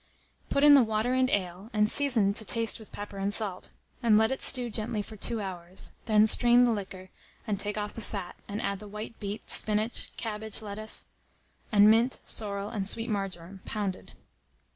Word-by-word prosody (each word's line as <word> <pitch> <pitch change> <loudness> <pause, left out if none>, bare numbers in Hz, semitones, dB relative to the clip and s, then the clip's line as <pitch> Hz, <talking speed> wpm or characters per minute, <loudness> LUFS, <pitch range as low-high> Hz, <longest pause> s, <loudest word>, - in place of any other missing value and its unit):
Put 280 - 0
in 295 0 +8
the 280 - +7
water 220 +2 -1
and 255 0 +2
ale, 190 0 -3
and 210 -1 +2
season 230 -6 +2
to 220 - +1
taste 230 +2 +3
with 220 - -14
pepper 205 -1 -8
and 195 +1 -1
salt, 205 -3 -3 0.3
and 225 -3 +4
let 220 +2 +2
it 265 - -4
stew 245 -3 +7
gently 215 -1 -2
for 215 - -11
2 225 +2 -1
hours; 185 -2 -5 0.2
then 215 -1 +4
strain 240 +2 +5
the 245 - +3
liquor, 190 -3 -6 0.3
and 210 -4 -3
take 205 +1 -2
off 210 0 -4
the 230 - -8
fat, 195 -4 -7
and 205 +1 -5
add 200 -1 -3
the 210 - -11
white 210 +2 -8
beet, 205 0 -6
spinach, 215 +2 +1
cabbage 220 -1 -3
lettuce, 215 +1 -2 0.7
and 205 -1 +6
mint, 235 +4 +2
sorrel, 200 -1 -2
and 200 -4 -3
sweet 225 +1 -1
marjoram, 190 -2 -5
pounded. 200 -4 -5
210 Hz, 185 wpm, -28 LUFS, 200-225 Hz, 0.7 s, in